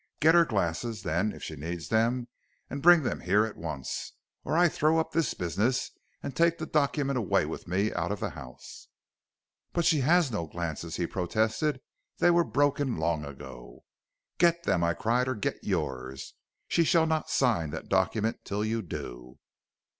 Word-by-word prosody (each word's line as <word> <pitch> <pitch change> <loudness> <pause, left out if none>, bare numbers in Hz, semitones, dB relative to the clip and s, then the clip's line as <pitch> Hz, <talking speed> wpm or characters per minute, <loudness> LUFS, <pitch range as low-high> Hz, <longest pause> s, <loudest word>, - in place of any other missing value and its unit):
Get 160 +2 +5
her 170 -1 +6
glasses, 105 - -2
then, 95 +5 0
if - - -11
she 80 - -5
needs 85 +3 -5
them, 120 +2 +1 0.4
and 140 +1 -4
bring 175 -1 +7
them 120 - -2
here 100 +5 +3
at 110 - -7
once, 75 -5 -5 0.3
or 160 - 0
I 175 0 +6
throw 155 0 +2
up 160 - 0
this 165 -1 0
business 105 +8 0 0.3
and 140 - -5
take 170 0 +3
the 160 - -4
document 140 -3 +1
away 110 - +2
with - - -7
me 100 +4 0
out 85 +2 -2
of 105 - -3
the - - -3
house.' 65 -5 -11 0.9
"'But 170 -1 0
she 165 -3 +4
has 160 +1 +3
no 85 -7 -3
glasses,' 85 0 -4
he 85 - -1
protested; 110 - -1 0.4
'they 175 - +4
were 170 0 +4
broken 145 - +1
long 80 -1 0
ago.' 65 -3 -10 0.6
"'Get 170 0 +4
them,' 85 - +1
I 85 0 +1
cried; 120 +3 +1
'or 130 - -1
get 105 - -3
yours, 65 -7 -3 0.3
she 170 - +3
shall 165 0 +4
not 160 -1 -1
sign 110 - +2
that 80 +2 -6
document 105 +4 0
till 105 +1 -2
you 115 +1 -1
do.' 60 - -8
110 Hz, 175 wpm, -28 LUFS, -, 0.9 s, bring